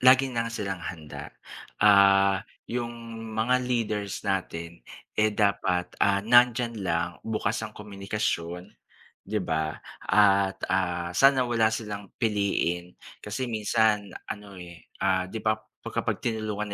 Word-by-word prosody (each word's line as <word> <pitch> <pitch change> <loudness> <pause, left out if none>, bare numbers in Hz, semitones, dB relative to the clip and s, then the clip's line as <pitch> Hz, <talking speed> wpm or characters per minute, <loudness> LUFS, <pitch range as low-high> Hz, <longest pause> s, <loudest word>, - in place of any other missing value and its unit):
lagi 130 +1 +6
ng 115 -1 -1
silang 100 -5 -4
handa, 80 -4 -7 0.5
ah, 100 -1 +6 0.2
'yung 120 0 -3 0.5
mga 120 +3 +3
leaders 110 -5 -2
natin, 85 -3 -3 0.3
eh, 110 0 +3
dapat, 100 -4 0
ah, 100 0 +3
nandiyan 120 -1 +4
lang 85 -2 0
bukas 110 0 -1
ang 110 -1 -7
komunikasyon 100 -4 -3 0.5
'di 110 - -2
ba? 80 -4 -1 0.3
At, 100 -2 +4
ah, 90 -2 -1
sana 135 +2 +5
wala 115 -2 +3
silang 105 -3 -5
piliin 100 -5 0 0.3
kasi 105 +5 -3
minsan 110 -2 +1 0.2
ano, 100 -2 -7
eh, 85 -1 -11 0.2
ah, 95 -1 +1
'di 110 - -4
ba 110 - +4 0.3
kapag - - -1
tinulungan 110 -2 -2
105 Hz, 120 wpm, -27 LUFS, 95-110 Hz, 0.5 s, lagi